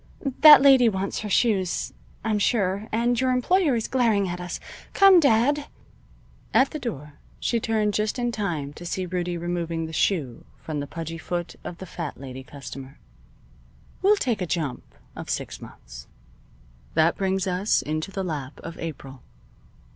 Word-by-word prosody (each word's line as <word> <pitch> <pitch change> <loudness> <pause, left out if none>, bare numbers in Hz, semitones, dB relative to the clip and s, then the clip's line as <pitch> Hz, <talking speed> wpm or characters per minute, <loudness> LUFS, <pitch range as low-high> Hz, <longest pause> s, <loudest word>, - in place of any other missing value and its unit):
That 300 -3 +10
lady 265 -4 +7
wants 195 -1 -3
her 210 - -5
shoes, 195 -4 +1 0.3
I'm 215 -2 +1
sure, 200 -1 0
and 235 +2 +1
your 260 - +2
employer 280 +4 +2
is 225 - -2
glaring 225 -6 +2
at 180 0 -4
us. 180 0 -5 0.4
Come, 390 -2 +8
dad." 285 +1 +3 0.9
At 265 +1 +4
the 305 - -5
door 150 - -6 0.2
she 235 - 0
turned 215 -2 0
just 215 +4 -1
in 240 -1 -1
time 165 -10 -3
to 170 - -11
see 185 +2 -3
Rudie 175 -1 -3
removing 170 -1 -3
the 160 - -8
shoe 150 - 0
from 155 -2 -5
the 145 - -4
pudgy 165 +1 -6
foot 175 +1 -4
of 170 - -7
the 190 - -8
fat 170 -4 -6
lady 130 -1 -8
customer. 135 0 -10 1.0
We'll 400 +3 +5
take 240 - -1
a 180 - -1
jump 155 -6 -4 0.2
of - - -8
six - - -4
months. - - -12 0.9
That 160 +1 +4
brings 190 -1 0
us 190 +3 +1
into 155 +4 -3
the 195 -1 -4
lap 145 -6 -5
of 165 0 -8
April. 135 -5 -7
185 Hz, 160 wpm, -25 LUFS, 160-230 Hz, 1.0 s, That